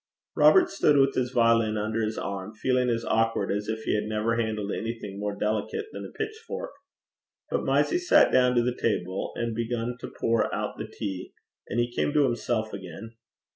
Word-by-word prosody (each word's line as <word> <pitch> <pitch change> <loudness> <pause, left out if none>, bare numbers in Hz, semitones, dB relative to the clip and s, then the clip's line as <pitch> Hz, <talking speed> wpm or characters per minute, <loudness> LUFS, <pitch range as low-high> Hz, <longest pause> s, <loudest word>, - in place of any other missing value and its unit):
Robert 365 -1 +6
stood 145 - +3
with 135 0 +4
his 125 -1 0
violin 115 -3 +3
under 110 +2 -1
his 110 0 -2
arm, 100 +2 -5
feeling 125 +2 +1
as 115 -1 -1
awkward 115 -3 +1
as 105 +1 -2
if 110 0 -3
he - - 0
had 105 - 0
never 110 +2 0
handled 110 -3 -1
anything 115 -3 -4
more 105 0 -2
delicate 430 - -2
than - - -6
a - - -8
pitchfork. 440 +1 -5 0.8
But - - 0
Mysie 355 - +2
sat 355 -4 +5
down 125 -1 +4
to 120 - +4
the 125 0 0
table, 95 -4 -1
and 115 -1 -2
began 115 +1 -2
to - - -6
pour 115 0 +1
out - - -4
the - - -4
tea, 95 -3 -6 0.4
and 120 - -1
he 120 0 0
came 145 - 0
to 150 - +4
himself 110 -3 -1
again. 95 +4 -8
115 Hz, 190 wpm, -27 LUFS, 105-125 Hz, 0.8 s, Robert